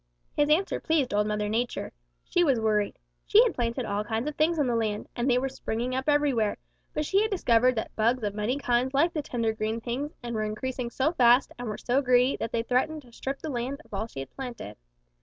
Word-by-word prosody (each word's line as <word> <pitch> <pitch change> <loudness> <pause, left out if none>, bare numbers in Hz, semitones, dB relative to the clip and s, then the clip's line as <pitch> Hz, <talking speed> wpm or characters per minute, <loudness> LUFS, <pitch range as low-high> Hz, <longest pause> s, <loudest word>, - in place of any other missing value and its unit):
"His 295 0 +2
answer 335 +6 +2
pleased 305 -8 +1
Old 210 0 +2
Mother 210 0 -1
Nature. 235 +3 -2 0.3
She 355 - +2
was 270 -7 +3
worried. 210 -2 +1 0.3
She 435 +3 +7
had 480 - +1
planted 240 +1 -2
all 205 0 -1
kinds 225 +4 -2
of 300 - -3
things 320 +2 +2
on 295 - +2
the 240 -2 0
land, 215 -2 -1
and 240 +2 0
they 245 - +4
were 265 +2 0
springing 250 -1 -3
up 265 +3 -1
everywhere, 280 -8 +2 0.3
but 300 - -2
she 390 +6 +3
had 435 - +1
discovered 255 - +3
that 220 - -4
bugs 230 +2 +1
of 205 -1 -1
many 215 +6 -1
kinds 255 0 0
liked 330 +5 +3
the 305 - -1
tender 230 -5 -1
green 220 +1 -2
things 255 +6 -4
and 235 0 -4
were 215 - -1
increasing 240 +3 -3
so 270 +5 +1
fast 245 -3 +5
and 245 - -4
were 215 - -3
so 255 +3 +1
greedy 250 0 +3
that 225 - -4
they 230 - 0
threatened 280 +6 0
to 240 -2 -19
strip 270 +3 -5
the 315 - -3
land 255 +3 -3
of - - -18
all 200 +2 -1
that 230 - -15
she 135 - -5
had 135 - -9
planted. 245 - -7
245 Hz, 240 wpm, -27 LUFS, 225-280 Hz, 0.3 s, She